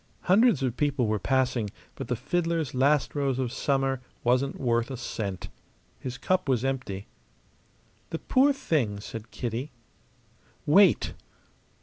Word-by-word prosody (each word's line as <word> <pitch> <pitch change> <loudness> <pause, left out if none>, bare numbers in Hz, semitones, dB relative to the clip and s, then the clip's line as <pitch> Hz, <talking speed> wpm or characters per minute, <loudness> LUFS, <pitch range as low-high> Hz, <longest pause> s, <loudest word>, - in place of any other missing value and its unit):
Hundreds 200 - +4
of 125 -2 0
people 140 -3 +1
were 105 -1 0
passing; 125 -1 +1 0.2
but - - -7
the - - 0
fiddler's 165 -5 -1
"Last 140 +3 +2
Rose 140 -3 0
of 130 -3 -1
Summer" 135 -1 0 0.2
wasn't 130 +3 +1
worth 120 -2 +1
a 135 - -5
cent. 105 -5 -4 0.5
His 125 -1 -5
cup 185 -6 0
was 130 -1 +2
empty. 125 -8 -3 1.0
"The 165 - -3
poor 265 - +3
thing!" 140 - 0
said 115 +2 -8
Kitty. 120 +4 -4 1.0
"Wait!" 190 +7 +5
130 Hz, 130 wpm, -27 LUFS, 120-150 Hz, 1.0 s, Wait